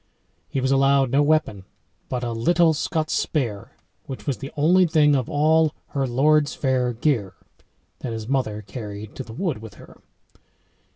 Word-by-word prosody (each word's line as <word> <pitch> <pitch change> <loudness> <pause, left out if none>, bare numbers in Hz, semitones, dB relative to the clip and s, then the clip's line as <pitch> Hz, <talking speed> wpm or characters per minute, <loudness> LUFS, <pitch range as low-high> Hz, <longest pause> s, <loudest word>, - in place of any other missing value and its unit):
He 135 - -2
was 130 +1 0
allowed 135 -1 +3
no 140 - +3
weapon 145 -10 +1 0.5
but 125 -1 -3
"a 120 - -2
lyttel 165 +8 +3
Scots 155 +1 -2
spere," 115 -10 -2 0.3
which 130 -6 -7
was 140 - -1
the 135 0 -7
only 175 +5 +4
thing 150 -2 +4
of 130 -3 -1
all 155 +1 +3
"her 135 -2 -1
lordes 145 +4 +2
faire 130 -3 0
gere" 115 - -1 0.6
that 125 - -5
his 110 -1 -5
mother 115 -6 -1
carried 105 0 -8
to 135 - -4
the 115 - -12
wood 165 - -2
with 110 -3 -11
her. - - -16
135 Hz, 165 wpm, -23 LUFS, 115-150 Hz, 0.6 s, only